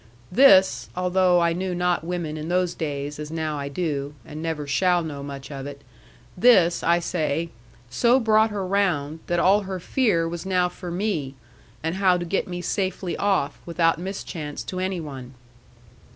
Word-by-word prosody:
This 190 -4 +5
(although 180 0 +3
I 170 0 +2
knew 180 +1 -3
not 180 -1 0
women 170 -3 -3
in 155 +1 -5
those 180 -1 +1
days, 145 -1 -4
as 150 0 -5
now 155 -2 -3
I 140 0 -4
do, 145 -2 -3
and 155 -1 -8
never 160 -3 -3
shall 175 +5 +2
know 145 -3 -6
much 140 0 -8
of 135 -1 -6
it), 140 0 -10 0.5
this, 180 -5 +5
I 170 +1 +3
say, 165 -1 -2 0.4
so 240 - +4
brought 220 -2 +4
her 205 -3 -3
round, 175 -6 0
that 175 0 +1
all 195 +4 +4
her 190 -2 -5
fear 180 -5 +1
was 170 0 -5
now 180 -2 +1
for 180 0 -8
me, 170 -7 -2 0.5
and 165 +3 -2
how 185 -2 +4
to 175 - -4
get 190 +3 -1
me 175 -1 -5
safely 190 -1 -2
off, 195 -8 0
without 165 -1 +1
mischance 170 -5 -5
to 185 - -5
any 185 -1 -2
one. 135 -5 -8
175 Hz, 175 wpm, -24 LUFS, 150-185 Hz, 0.5 s, This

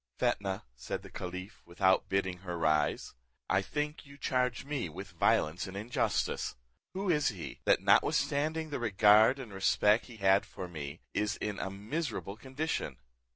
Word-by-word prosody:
"Fetnah," 95 -1 0
said 60 - -5
the - - -11
caliph, 90 +2 -6
without 95 +2 +2
bidding 95 -2 0
her 90 -2 -5
rise, 75 -4 +1 0.3
"I 95 - +3
think 150 +8 -3
you 140 -1 -14
charge 125 -2 0
me 140 - -2
with 95 +5 -8
violence 80 0 +2
and 95 +1 -7
injustice. 110 +4 -1 0.4
Who 190 -1 0
is 150 -3 +2
he, 85 - -7
that, - - +4
notwithstanding 155 +2 +2
the 140 - -2
regard 110 +2 +5
and 130 -6 -8
respell 105 +2 +3
he 120 -3 -13
had 95 -1 +4
for 90 - -7
me, 75 -3 -7
is 105 +1 0
in 105 -1 -3
a - - -2
miserable 105 +2 -4
condition? 130 - -3
100 Hz, 155 wpm, -32 LUFS, 90-130 Hz, 0.4 s, regard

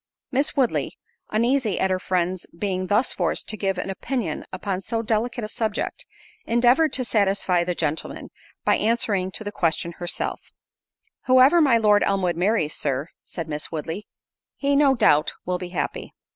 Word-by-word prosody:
Miss 275 +4 +1
Woodley, 260 -4 0 0.3
uneasy 235 -1 +1
at 190 - +1
her 185 - +1
friend's 185 -1 -1
being 185 -1 -2
thus 210 +6 +2
forced - - 0
to 215 - +1
give 195 -3 -1
an 195 - -3
opinion 195 - -3
upon 185 0 -3
so 225 +3 -2
delicate 230 +2 -1
a - - -2
subject, 220 - -3 0.4
endeavoured 245 +7 +3
to 255 - 0
satisfy 195 -5 +2
the 180 0 -2
gentleman, 155 -1 -3 0.3
by - - +4
answering 210 -4 +1
to - - -4
the 205 - -4
question 170 -2 0
herself: 175 -1 -2 0.9
"Whoever 260 +6 +6
my 265 -6 +5
Lord 210 -2 +4
Elmwood 185 -3 +1
marries, 175 -3 +1
Sir," 140 +2 -2 0.2
said 165 -3 -6
Miss 150 -1 -4
Woodley, 165 +5 -5 0.5
"he, 280 0 0
no 280 -2 +5
doubt, 155 - +3
will 180 0 -1
be 180 -1 -6
happy." 180 - -4
205 Hz, 160 wpm, -24 LUFS, 180-235 Hz, 0.9 s, Whoever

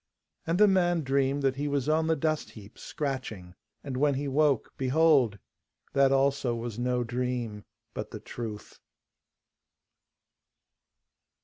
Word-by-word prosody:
And 165 +1 +1
the 210 +1 +6
man 175 -3 +2
dreamed 135 +1 +1
that 135 -1 +1
he 145 +1 -1
was 140 -2 -1
on 160 +1 +2
the 160 - +3
dust 155 +1 -1
heap, 105 0 -14
scratching. 125 -11 -5 0.3
And 135 -3 -5
when 145 0 +2
he 140 +2 -2
woke, 140 -2 +1
behold! 135 -5 +3 0.6
that 135 -1 +4
also 135 -2 +2
was 115 -1 -5
no 125 0 0
dream, 120 -3 -3 0.3
but - - -5
the - - -8
truth. 110 -3 -8
135 Hz, 130 wpm, -28 LUFS, 120-150 Hz, 0.6 s, the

